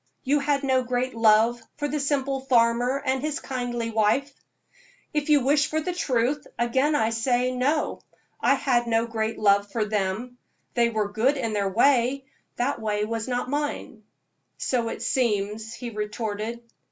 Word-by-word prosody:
You 290 +2 +2
had 280 0 0
no 260 -1 +2
great 250 +1 -2
love 225 +1 +4 0.2
for 290 - -1
the 300 +1 -2
simple 275 -1 0
farmer 245 +1 +2
and 260 -1 0
his 300 0 -2
kindly 240 -3 -3
wife?" 225 +6 +1 0.8
"If 300 0 -1
you 295 -2 +5
wish 290 +3 +3
for 310 - 0
the 355 +3 -3
truth, 275 -3 0
again 260 +5 +1
I 225 -5 +2
say 245 +2 +1
no. 270 +5 0 0.4
I 275 - +4
had 245 -3 +1
no 225 0 +2
great 225 -1 -2
love 200 -1 +3
for 220 -1 0
them. 210 +4 -2 0.3
They 235 -1 +3
were 215 -3 -1
good 245 +7 +2
in 230 -5 -2
their 200 -2 0
way 255 +4 +2 0.3
that 250 +1 -1
way 210 -1 0
was 225 +1 -3
not 245 -1 -2
mine." 290 -5 -3 0.6
"So 235 -3 -1
it - - -5
seems," 215 -3 0
he 240 -2 -6
retorted. 215 +1 -4
245 Hz, 165 wpm, -25 LUFS, 220-275 Hz, 0.8 s, you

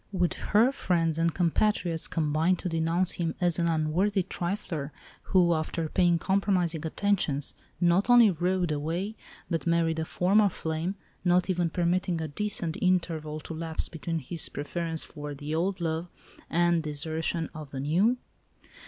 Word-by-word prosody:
Would 180 -3 +1 0.2
her 225 +5 +5
friends 165 - 0
and 165 0 +2
compatriots 175 -1 +1
combine 160 +3 +1
to 180 - -5
denounce 165 +2 +1
him 165 -2 -2
as 175 -2 +1
an 170 - +2
unworthy 170 +5 +1
trifler, 175 -6 -3 0.4
who, 180 -3 +4
after 160 +1 -2
paying 175 0 +3
compromising 185 -3 +1
attentions, 160 -7 0 0.3
not 175 +5 +3
only 240 -4 +8
"rode 180 0 0
away," 165 +8 -2 0.3
but 165 -1 -2
married 165 -1 +2
a 160 - -1
former 200 +5 +3
flame, 165 +2 -3 0.3
not 180 +1 +3
even 175 -2 0
permitting 175 0 0
a 160 - -2
decent 175 0 -2
interval 165 -5 0
to 165 - -7
elapse 160 0 -3
between 165 0 -3
his 160 +3 -3
preference 165 +2 -3
for 150 -2 -7
the 145 +2 -5
old 185 +4 0
love 165 0 -2 0.4
and 175 0 +3
desertion 160 +2 -3
of 155 -3 -8
the 135 - -6
new? 185 - +2
170 Hz, 150 wpm, -28 LUFS, 160-185 Hz, 0.4 s, only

